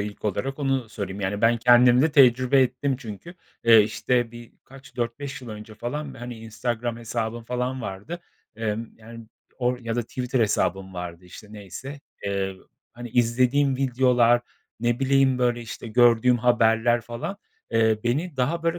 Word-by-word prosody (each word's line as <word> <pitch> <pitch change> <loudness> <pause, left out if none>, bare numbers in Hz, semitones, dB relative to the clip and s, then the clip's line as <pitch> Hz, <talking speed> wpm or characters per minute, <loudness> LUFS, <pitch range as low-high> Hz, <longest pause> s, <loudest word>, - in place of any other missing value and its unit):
ilk 105 +1 -6
olarak, 110 +7 -2
onu 135 -4 -1
söyleyeyim. 100 -2 -6
Yani, 100 +1 -2
ben 115 +2 +4
kendimde 125 +5 +5
tecrübe 130 -1 +5
ettim 130 +2 -1
çünkü. 120 - -9 0.3
Eee, 115 -2 +8
işte, 115 +3 0
bir 120 0 -12
kaç, 135 +1 -16
4-5 130 +4 -4
yıl 125 - -9
önce 110 0 -9
falan, 140 +6 -5
hani, 120 0 -8
Instagram 115 +1 -3
hesabım 115 0 -4
falan 125 +2 -3
vardı. 105 - -6 0.4
Emm, 115 0 -3
yani 115 +1 -12 0.3
or 125 0 0
ya 115 -1 -4
da 120 - +1
Twitter 125 +2 -2
hesabım 95 -3 0
vardı 90 0 -7
işte, 90 +4 -12
neyse. 120 +8 -9 0.2
Eee, 95 -1 -2 0.4
hani, 120 0 -8
izlediğim 125 +4 +2
videolar, 125 -2 +3 0.4
ne 120 0 +1
bileyim 135 -1 +3
böyle, 120 -1 +1
işte, 115 +1 -8
gördüğüm 120 +1 +4
haberler 120 0 +3
falan, 120 - -6 0.3
eee, 110 -1 +3
beni 145 +7 -1
daha 150 +7 0
böyle 165 +1 0
120 Hz, 155 wpm, -24 LUFS, 110-130 Hz, 0.4 s, Eee